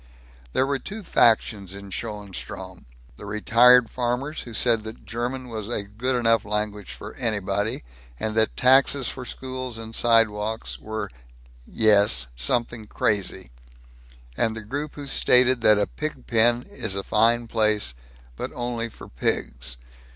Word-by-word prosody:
There 130 - +2
were 140 0 -1
two 210 +7 -7
factions 110 - +2
in 100 0 -10
Schoenstrom: 105 -2 -7 0.3
the - - -10
retired 115 +3 +5
farmers 125 +6 -2
who 120 - -9
said 115 -2 +3
that 110 +1 -10
German 125 +3 -4
was 110 -3 -6
a 115 -3 -2
good 115 +6 -2
enough 115 -2 +2
language 105 -1 -3
for 105 - -9
anybody, 105 - -1 0.4
and 110 0 -2
that 110 0 +1
taxes 135 0 +4
for 125 - -7
schools 130 -2 -6
and 115 0 -8
sidewalks 110 -2 +1
were 110 0 -4 0.6
yes 100 - +3
something 110 - 0
crazy; 95 - -1 0.8
and 110 - 0
the 115 - -6
group 145 +8 -5
who 145 - -7
stated 130 -2 +3
that 105 -2 +6
a 105 - +2
pig 150 -4 -6
pen 120 +1 +3
is 95 - -2
a 100 - -2
fine 115 +3 +2
place, 105 - +1 0.4
but - - -4
only 120 -2 -3
for - - -12
pigs. - - -2
115 Hz, 145 wpm, -24 LUFS, 105-125 Hz, 0.8 s, that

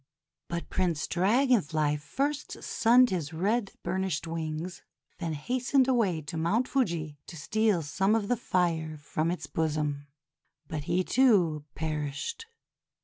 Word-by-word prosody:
But 170 0 -5
Prince 170 -6 0
Dragon 235 +6 +3
Fly 150 -1 0
first 275 - -3
sunned 245 +1 +4
his 165 -4 -2
red 200 +5 0
burnished 190 -4 -1
wings, 165 +2 -4 0.4
then 165 -3 -2
hastened 250 - +1
away 215 -11 +2
to 155 +3 -5
Mount 205 +10 +1
Fuji 165 - -1
to 165 - -9
steal 205 +3 +1
some 195 +8 +1
of 215 -3 0
the 245 - +2
fire 165 -8 0
from 155 +2 -2
its 175 - -3
bosom. 150 -2 -1 0.6
But 150 -2 -4
he, 180 +3 +1
too, 180 - +3
perished. 155 - -3
170 Hz, 135 wpm, -29 LUFS, 155-220 Hz, 0.6 s, sunned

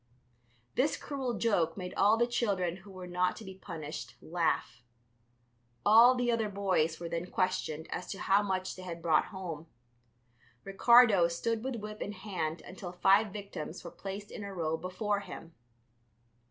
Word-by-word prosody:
This 285 +4 +1
cruel 265 -4 -3
joke 180 -8 +1
made 180 -2 -5
all 205 +3 +4
the 235 - +4
children 195 -7 0
who 195 +2 -14
were 185 -1 -8
not 180 0 0
to - - -10
be 190 - -8
punished 150 -9 -7
laugh. 160 -7 -1 1.0
All 230 +4 +8
the 245 -1 +1
other 225 -2 0
boys 190 -5 0
were 170 - -5
then 170 +1 -3
questioned 175 -4 -1
as 180 - -4
to 195 - -5
how 200 +1 +4
much 190 -2 -2
they 185 - -10
had 170 -2 -7
brought 160 -2 +4
home. 170 -5 -7 1.0
Ricardo 205 -2 +6
stood 220 +7 -2
with 265 -1 -2
whip 210 -1 -7
in 205 - -3
hand 180 -5 -4
until 185 -1 -8
five 195 +4 +4
victims 195 -5 -7
were 170 - -8
placed 200 +1 -7
in 210 - -7
a 200 - -6
row 165 -4 -1
before 200 +4 -2
him. 165 -4 -9
190 Hz, 165 wpm, -31 LUFS, 170-210 Hz, 1.0 s, All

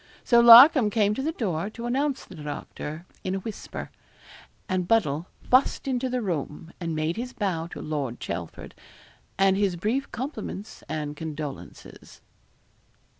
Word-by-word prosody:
So 235 - +5
Larcom 240 +1 +9
came 210 -1 +2
to 265 - -3
the 310 +4 -1
door 200 - -2
to 235 +2 -8
announce 270 +3 -1
the - - -13
doctor 150 +1 -7 0.2
in 185 0 -2
a - - -2
whisper, 210 +2 -7 0.8
and 185 -2 -1
Buddle 175 -7 +1 0.2
fussed 260 +2 +3
into 260 -1 -1
the 250 -1 -2
room, 165 -3 -4
and 165 -3 -3
made 155 +4 -1
his 250 +2 -5
bow 180 -6 -2
to - - -9
Lord 140 -6 -3
Chelford, 85 -1 -6 0.6
and 195 0 +4
his 195 -2 +1
brief 225 +10 -2
compliments 235 -5 -6
and 150 -1 -4
condolences. 150 -2 -8
195 Hz, 145 wpm, -26 LUFS, 155-240 Hz, 0.8 s, Larcom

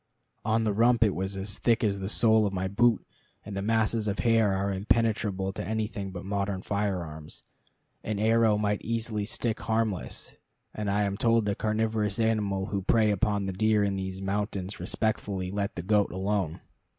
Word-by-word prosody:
On 110 +1 +1
the 105 -2 +1
rump 115 +2 +4
it 105 -3 +2
was 95 +2 -3
as 100 +1 -4
thick 115 -1 +2
as 100 -2 +1
the 95 0 -3
sole 110 -1 +4
of 100 - -4
my 95 0 -1
boot, 115 +3 +2 0.4
and 100 -1 -6
the 100 - -2
masses 110 +1 +1
of 100 0 -1
hair 115 -3 +3
are 100 +1 0
impenetrable 100 -2 0
to - - -4
anything 105 0 -3
but 90 0 -7
modern 100 -1 -2
firearms. 90 -7 -3 0.6
An 105 -1 -2
arrow 110 0 +3
might 105 -1 0
easily 115 -2 -2
stick 115 +1 -2
harmless; 110 -3 -2 0.4
and 105 -1 -3
I 105 +1 +2
am 100 0 -1
told 115 -2 +3
that 100 -1 -1
carnivorous 110 -1 0
animals 105 -3 0
who 100 -1 -1
prey 110 +2 +3
upon 100 0 0
the 95 - -3
deer 110 +2 +2
in 100 -1 0
these 95 0 -4
mountains 100 -1 -3
respectfully 100 -4 -2
let 100 +1 -2
the 85 - -4
goat 105 +1 +2
alone. 95 -2 -1
105 Hz, 180 wpm, -28 LUFS, 95-110 Hz, 0.6 s, rump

